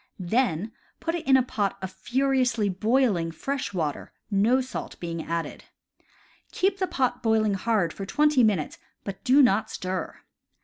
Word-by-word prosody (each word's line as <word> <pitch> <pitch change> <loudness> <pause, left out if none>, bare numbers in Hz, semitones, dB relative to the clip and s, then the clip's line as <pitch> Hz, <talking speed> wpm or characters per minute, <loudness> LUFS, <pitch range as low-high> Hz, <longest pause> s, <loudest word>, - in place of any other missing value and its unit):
Then 210 0 0 0.3
put 330 - -2
it 340 -5 -4
in 265 -1 +7
a 260 - +3
pot 205 -5 -2
of 190 -1 -5
furiously 245 +1 +1
boiling 210 -3 +1
fresh 270 - -3
water, 160 -7 -3 0.2
no 215 +6 +3
salt 255 -1 -6
being 165 -2 -4
added. 170 0 -4 0.9
Keep 385 +1 0
the 375 - +1
pot 260 -6 -1
boiling 220 -2 +2
hard 195 -4 0
for 195 - -7
twenty 295 +2 +3
minutes, 200 -9 +1 0.2
but 195 -1 -7
do 275 +1 +6
not 220 -4 +3
stir. 185 0 -4
220 Hz, 150 wpm, -26 LUFS, 190-260 Hz, 0.9 s, in